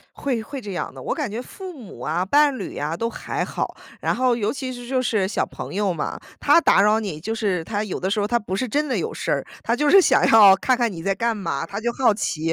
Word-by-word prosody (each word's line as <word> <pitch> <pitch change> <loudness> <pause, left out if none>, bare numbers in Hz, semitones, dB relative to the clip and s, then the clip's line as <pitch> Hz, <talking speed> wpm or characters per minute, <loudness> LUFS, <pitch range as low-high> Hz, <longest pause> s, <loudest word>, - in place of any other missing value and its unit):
会 250 -5 -2
会 275 +5 -7
这 205 -4 -7
样 - - -4
的。 - - -10
我 - - -2
感 290 -5 -3
觉 220 +3 -4
父 370 +8 -9
母 250 - -12
啊、 170 +4 -1
伴 285 +5 +3
侣 - - -6
啊， 150 +3 -2
都 230 +5 -1
还 - - -4
好， - - -4 0.3
然 - - 0
后 250 -1 +2
尤 215 -2 -1
其 265 -2 -5
是 245 -1 -9
就 260 +1 0
是 215 -6 +1
小 195 - 0
朋 - - -8
友 200 -1 +1
嘛， 165 - -4 0.2
他 - - +5
打 195 - +4
扰 210 +2 +4
你， 195 -8 -5
就 220 +7 -3
是 195 -7 -1
他 205 +3 -2
有 205 - -4
的 190 - -2
时 210 +1 +1
候 - - +1
儿 - - -8
他 240 +1 +2
不 205 -4 -5
是 250 +6 -1
真 295 +7 0
的 260 - 0
有 450 - -3
事 - - -3
儿， - - -1 0.2
他 230 - 0
就 295 +4 +1
是 390 - +8
想 270 -7 +4
要 205 -4 +8
看 255 +6 +1
看 235 -3 0
你 165 -3 -7
在 195 +3 0
干 230 +3 0
嘛， 165 -7 -3
他 200 +4 -5
就 240 +1 0
好 245 -3 +3
奇。 165 -5 -2
225 Hz, 300 characters per minute, -22 LUFS, 195-255 Hz, 0.3 s, 是